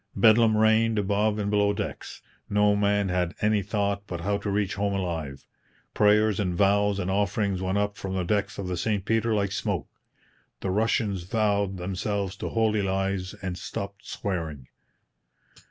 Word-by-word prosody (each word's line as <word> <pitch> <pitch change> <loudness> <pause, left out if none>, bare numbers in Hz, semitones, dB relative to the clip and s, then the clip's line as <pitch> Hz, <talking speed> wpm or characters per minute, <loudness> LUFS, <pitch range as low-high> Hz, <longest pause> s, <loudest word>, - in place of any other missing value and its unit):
Bedlam 110 -1 +5
reigned 110 +1 +3
above 105 +1 +1
and 100 -1 -1
below 105 0 +3
decks. - - -6 0.3
No 105 0 +3
man 100 -1 +1
had 90 -1 -1
any 105 -1 +2
thought 100 0 -2
but 85 -2 -5
how 100 +3 0
to 100 - -4
reach 100 -3 0
home 100 +2 -1
alive. 80 -8 -4 0.5
Prayers 105 0 +3
and 90 -4 0
vows 100 +1 +3
and 95 -1 -2
offerings 100 -1 0
went 95 +1 0
up 105 0 -1
from 95 -1 -4
the 95 - 0
decks 100 +3 -1
of 100 - -4
the 90 -1 -2
St 100 +1 -1
Peter 115 +1 +1
like 100 -2 0
smoke. - - -2 0.7
The 95 - -1
Russians 105 -2 +1
vowed 100 -1 0
themselves 95 +1 -2
to - - -4
holy 110 -2 +1
lives 95 0 -1
and 95 -2 -3
stopped 100 +2 -6
swearing. 80 -9 -4
100 Hz, 165 wpm, -26 LUFS, 95-105 Hz, 0.7 s, Bedlam